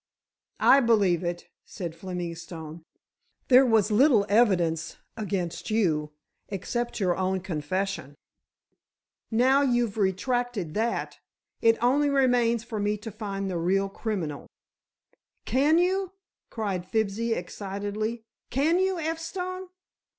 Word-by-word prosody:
"I 275 - +8
believe 205 -9 +3
it," 175 0 -4 0.2
said 175 -5 -6
Fleming 175 -1 -5
Stone. 165 -1 -9 0.7
"There 260 +1 +7
was 220 -2 +3
little 225 -2 +5
evidence 180 -7 +2 0.2
against 190 -5 -3
you, 160 -9 +1 0.4
except 240 +6 -3
your 180 -3 +1
own 190 0 0
confession. 180 -2 -3 1.1
Now 255 +5 +4
you've 240 -5 +1
retracted 205 -2 -1
that 230 +2 -2 0.4
it 225 0 +4
only 285 +4 +3
remains 245 -4 +2
for 230 -3 -5
me 205 +1 0
to 215 +2 -8
find 200 -2 -4
the 180 -3 -2
real 195 +3 +1
criminal." 190 -9 -4 1.0
"Can 290 +5 +3
you," 375 +1 +1 0.4
cried 200 -6 -3
Fibsy 220 +2 0
excitedly, 205 +3 -4 0.3
"can 315 +7 +2
you, 380 0 +1
F. 325 0 -2
Stone?" 370 +2 -5
215 Hz, 115 wpm, -27 LUFS, 185-245 Hz, 1.1 s, I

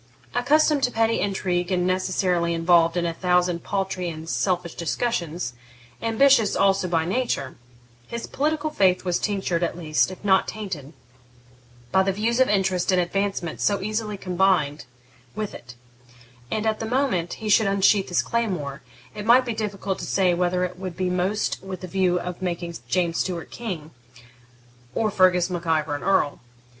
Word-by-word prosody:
Accustomed 290 +4 +3
to 245 - -2
petty 225 0 +1
intrigue, 185 -2 -1
and 180 -1 +1
necessarily 185 -2 +1
involved 165 0 +3
in 175 - +1
a 170 - -1
thousand 180 -1 +1
paltry 190 -3 -2
and 160 0 -8
selfish 180 -1 -1
discussions, 170 - -2 0.5
ambitious 230 -1 +4
also 195 -1 +2
by 165 -2 +1
nature, 180 - -1 0.5
his 235 0 -5
political 305 +2 -1
faith 185 -9 +2
was 180 -1 +1
tinctured, 190 -5 -1
at 170 -1 -1
least, 155 -1 +1
if 185 +2 -10
not 190 -1 +4
tainted, 175 -9 -6 1.0
by 190 - +4
the 195 +1 +1
views 225 +5 0
of 260 - +4
interest 190 -3 +1
and 185 - +3
advancement 180 -2 -2
so 205 -1 +2
easily 215 +1 -3
combined 180 -6 +1 0.5
with 215 -2 -4
it; 115 0 -11 0.7
and 215 0 -2
at 220 -1 0
the 225 - -3
moment 240 -9 0
he 220 - -7
should 215 0 +4
unsheathe 195 0 +3
his 175 - +1
claymore, 175 -12 -2 0.3
it 210 - -6
might 245 +4 +5
be 240 - -2
difficult 200 -3 -3
to - - -5
say 185 -2 +2
whether 180 +1 +1
it 180 0 -4
would 185 -3 -6
be 185 -1 0
most 185 +4 -1
with 190 -2 -7
the 185 - -6
view 180 -1 +1
of 180 +1 -6
making 175 -2 -3
James 175 -2 0
Stuart 180 -3 -1
a - - -7
king 180 -10 -5 1.0
or 215 -1 +1
Fergus 185 -2 +3
Mac 175 -1 -4
Ivor 155 -2 +1
an 145 - -6
earl. 190 -7 +1
185 Hz, 170 wpm, -24 LUFS, 175-210 Hz, 1.0 s, might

